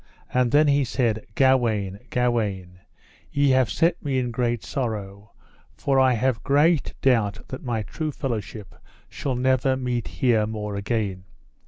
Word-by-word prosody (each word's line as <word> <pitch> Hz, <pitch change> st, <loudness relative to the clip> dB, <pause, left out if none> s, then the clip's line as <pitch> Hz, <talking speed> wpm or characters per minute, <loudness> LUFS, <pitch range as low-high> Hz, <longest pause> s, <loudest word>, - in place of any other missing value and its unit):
And 125 Hz, -1 st, +3 dB
then 150 Hz, +2 st, +5 dB
he 140 Hz, 0 st, +3 dB
said: 115 Hz, -4 st, -1 dB
Gawaine, 115 Hz, -8 st, +2 dB
Gawaine, 105 Hz, -7 st, -1 dB, 0.5 s
ye 140 Hz, -1 st, +3 dB
have 130 Hz, -4 st, +3 dB
set 165 Hz, -, +1 dB
me 140 Hz, -3 st, -1 dB
in 125 Hz, -2 st, -1 dB
great 120 Hz, -1 st, -1 dB
sorrow, 105 Hz, -5 st, -4 dB, 0.4 s
for 135 Hz, -1 st, +1 dB
I 130 Hz, -1 st, +5 dB
have 120 Hz, -1 st, 0 dB
great 150 Hz, +2 st, +2 dB
doubt 115 Hz, -6 st, +1 dB
that 130 Hz, -, -6 dB
my 115 Hz, -4 st, -2 dB
true 155 Hz, -, -4 dB
fellowship 110 Hz, -, -5 dB, 0.4 s
shall 135 Hz, -3 st, -3 dB
never 130 Hz, +1 st, +2 dB
meet 125 Hz, -2 st, -2 dB
here 115 Hz, -4 st, +1 dB
more 105 Hz, -2 st, -4 dB
again. 100 Hz, -3 st, -2 dB
120 Hz, 145 wpm, -24 LUFS, 105-130 Hz, 0.5 s, then